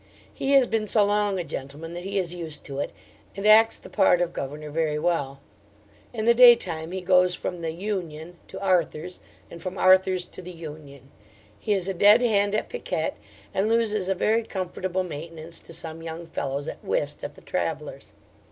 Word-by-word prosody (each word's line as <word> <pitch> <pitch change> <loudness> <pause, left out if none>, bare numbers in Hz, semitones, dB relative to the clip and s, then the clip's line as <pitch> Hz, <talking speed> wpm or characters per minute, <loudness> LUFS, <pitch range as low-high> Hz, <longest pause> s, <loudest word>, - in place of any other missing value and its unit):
He 275 +1 -1
has 270 -2 +7
been 220 -2 -1
so 210 -1 +4
long 205 -1 +1
a 180 - -2
gentleman 150 +3 -7
that 175 0 -6
he 200 +1 -3
is 180 -3 -1
used 160 -4 -4
to 140 -1 -5
it, - - -2 0.5
and 200 - -4
acts 220 +1 +6
the - - -13
part 190 -3 +3
of 175 -1 -1
governor 150 +2 -6
very 155 -1 0
well. 145 -4 -1 0.7
In 220 -3 -3
the 235 - +6
day 240 0 +9
time 165 -6 -5
he 190 0 -4
goes 180 0 +4
from 180 -1 -5
the 165 -1 -2
'Union' 175 -3 -5
to 190 - -8
'Arthur's,' 180 -2 0 0.3
and 170 - -10
from 185 0 -5
'Arthur's' 185 0 +4
to 185 - -10
the 180 - -9
'Union.' 150 -5 -11 0.5
He 210 - 0
is 190 -2 -1
a 195 - -1
dead 205 +6 +6
hand 205 -3 +2
at 215 - -1
piquet, 485 - -3 0.4
and 200 +3 +1
loses 215 -4 +1
a 190 - +2
very 220 +5 +2
comfortable 185 -2 -3
maintenance 165 0 -8
to - - -14
some 165 0 -6
young 165 +1 -6
fellows, 140 -3 -4
at - - -7
whist, - - -2
at - - -6
the - - -16
'Travellers'.' - - -4
180 Hz, 195 wpm, -25 LUFS, 160-205 Hz, 0.7 s, day